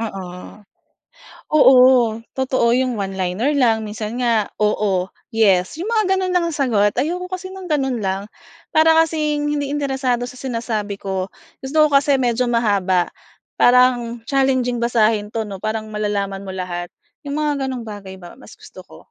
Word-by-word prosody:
Oo. 195 -5 -5 1.2
Oo, 265 -3 +7 0.6
totoo 260 -2 +1
yung 255 -4 0
one-liner 195 +8 -1
lang, 225 -5 +2
minsan 215 +3 -5
nga, 230 -4 +1
"oo," 200 -3 +1 0.2
"yes," 205 - +2
yung 380 - -4
mga 430 -5 +2
ganun 370 -1 -1
lang 350 - +3
ang 310 - -5
sagot. 210 -6 +2
Ayoko 360 +6 -2
kasi 370 0 -5
ng 380 -1 -8
ganun 265 -7 0
lang 195 +2 -2 0.5
para 315 +1 +6
kasing 300 -2 -1
hindi 285 -1 -2
interesado 265 -4 -1
sa 250 - -11
sinasabi 230 -5 -4
ko. 190 -1 -4 0.3
Gusto 305 +3 +3
ko - - -7
kasi 280 -1 +3
medyo 245 0 0
mahaba, 200 -6 +1 0.5
parang 245 -1 +3
challenging 260 -3 +1
basahin 215 -3 +1
'to 220 -2 -3
'no, 195 -2 -8
parang 220 0 -3
malalaman 200 -2 -2
mo 190 - -7
lahat. 175 -2 -5 0.3
Yung 285 +1 -3
mga 290 -3 -1
ganong 245 -4 -5
bagay 195 -2 -9
ba 175 +2 -12
mas 260 - -15
gusto - - -13
ko. - - -16
235 Hz, 155 wpm, -20 LUFS, 205-275 Hz, 1.2 s, Oo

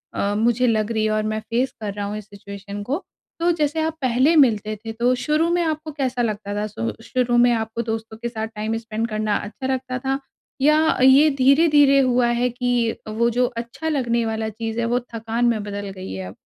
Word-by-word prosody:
अ, 200 +1 0
मुझे 240 +2 +2
लग 220 -1 +1
रही 220 -1 0
है 215 - +1
और 215 0 0
मैं 215 - -2
फ़ेस 240 +4 -1
कर 205 -2 -3
रहा 205 0 -4
हूँ 210 +1 -4
इस 215 - -8
सिचुएशन 200 0 -8
को। 285 - -3 0.4
तो 340 +1 +3
जैसे 310 -1 0
आप 320 0 -2
पहले 260 +5 +3
मिलते 215 -7 +3
थे 225 - -3
तो 240 +2 +2
शुरू 310 +3 +2
में 350 - +2
आपको 310 -1 -3
कैसा 260 -4 -2
लगता 210 -3 -2
था? 210 +1 -1
श 115 - -4
शुरू 245 -2 +1
में 245 0 +5
आपको 225 0 -2
दोस्तों 225 -1 -5
के 235 +1 -4
साथ 220 -2 -4
टाइम 220 +2 -2
स्पेंड 225 0 -3
करना 215 -1 -1
अच्छा 220 +5 -6
लगता 255 0 -3
था? 270 +1 -1 0.4
या 305 +3 +4
ये 275 +4 +7
धीरे-धीरे 280 0 +5
हुआ 250 -2 +3
है 240 +1 +1
कि, 245 -1 0
वो 225 +2 +1
जो 245 +2 +2
अच्छा 235 +7 -4
लगने 240 -6 0
वाला 220 0 -2
चीज़ 225 +1 -4
है 235 - 0
वो 240 +2 +1
थकान 230 +1 -1
में 230 -3 +2
बदल 205 -1 -5
गई 190 -1 -8
है 95 -1 -5
अब? 95 - -10
235 Hz, 220 wpm, -22 LUFS, 215-260 Hz, 0.4 s, ये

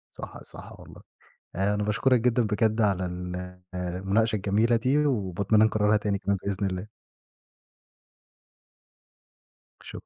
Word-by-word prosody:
صح، - - -9
صح - - -11
والله. - - -13 0.6
آآ، 100 +3 +1
أنا 105 - -1
باشكرك 120 +5 +2
جدًا 125 0 +2
بجد 110 +1 +1
على 100 -3 +1
ال 90 0 -6 0.2
المناقشة 95 +5 0
الجميلة 105 +4 +2
دي، 135 +6 +2
وباتمنى 105 -4 +2
نكرّرها 110 -1 +3
تاني 105 -1 -1
كمان 100 -1 0
بإذن 100 0 -1
الله. 95 +2 -4 3.0
شك - - -9
105 Hz, 120 wpm, -26 LUFS, 95-110 Hz, 3.0 s, نكرّرها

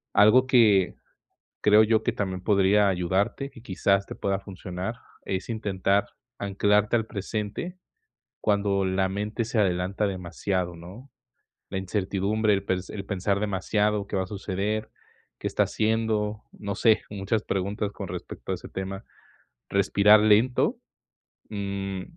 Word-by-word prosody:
Algo 115 +6 +6
que, 110 -7 +4 0.7
creo 105 +1 +6
yo 110 0 +2
que - - 0
también 95 -2 -3
podría 100 0 +4
ayudarte, 95 +9 0
que 115 - -14
quizás 100 -1 +1
te - - -7
pueda 100 -1 -1
funcionar, 95 +2 -6 0.3
es 95 +3 -3
intentar 100 -3 0 0.3
anclarte 105 +3 +2
al 110 -1 -1
presente, 105 - -4 0.6
cuando 100 -2 +1
la 95 0 +1
mente 105 +4 -2
se 115 -1 -1
adelanta 95 +2 +1
demasiado, 90 -1 -2
¿no? 95 +11 -12 0.6
La 95 - -3
incertidumbre, 100 +3 0
el 100 -1 0
pers 95 -1 -2
el 100 -2 -6
pensar 100 0 -1
demasiado, 105 +1 0
¿qué - - -4
va 95 - +1
a - - -8
suceder, 105 +2 -3 0.5
qué - - -2
está - - +2
haciendo?, 110 -1 0
no 100 -1 -5
sé, 110 +1 +4
muchas 105 +2 -1
preguntas, 100 +2 -2
con 100 -1 -7
respecto 90 0 -7
a - - +1
ese - - -11
tema. 95 0 -5 0.7
Respirar 100 +2 +5
lento, 110 +4 +3 0.7
mm 100 -2 -4
100 Hz, 140 wpm, -26 LUFS, 95-105 Hz, 0.7 s, Algo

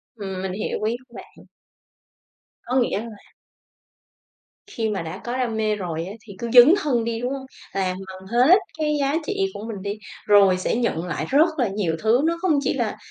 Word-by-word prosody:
Ừm, 190 -4 -5
mình 190 0 -3
hiểu 210 - -3
ý 225 +2 +1
của 235 - -25
bạn. - - -13 1.2
Có 250 - -3
nghĩa 210 - 0
là 230 +1 -6 1.6
khi 225 - -2
mà 200 - -2
đã 165 +4 -7
có 240 +1 -3
đam 240 -4 -1
mê 215 -1 +1
rồi 170 -5 -4
á 195 - -7
thì 200 - -9
cứ 235 - -3
dấn 250 +6 +9
thân 245 -6 +1
đi, 230 0 -2
đúng 250 +2 -2
hông? 270 -1 -6 0.3
Làm 185 -1 -1
bằng 190 0 -10
hết 255 - +5 0.2
cái 300 -1 +1
giá 275 +1 +1
trị 410 - -2 0.2
của - - -7
mình 205 -4 -6
đi, 205 +1 -4 0.3
rồi 200 -3 +6
sẽ 185 - -1
nhận 230 -8 -1
lại 180 - -3
rất 305 +5 +5
là 240 - +3
nhiều 190 -5 -1
thứ. 225 +4 +4
Nó 335 +1 +1
không 320 -7 +2
chỉ - - 0
là, - - -2
225 Hz, 205 wpm, -23 LUFS, 195-255 Hz, 1.6 s, dấn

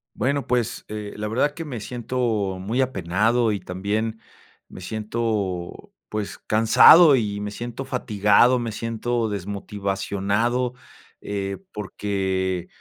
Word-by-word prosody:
Bueno, 140 +2 -1
pues, 120 -3 -1
eh, 105 -1 -6
la 105 0 -4
verdad 130 +7 +1
que 165 - -6
me 130 -7 -6
siento 115 -4 -2
muy 110 +7 -1
apenado 110 +1 +1
y 100 - -2
también 105 +5 -3 0.5
me - - -11
siento, 105 -3 -3 0.2
pues, 105 -1 -4
cansado, 135 +8 +7
y 105 -4 -1
me 105 0 -4
siento 120 +4 -6
fatigado, 110 0 +3
me 120 -2 -3
siento 115 +1 -2
desmotivado. 100 +4 -2 0.5
Eh, 100 -1 -3
porque, 95 -3 -2
110 Hz, 115 wpm, -23 LUFS, 100-120 Hz, 0.5 s, cansado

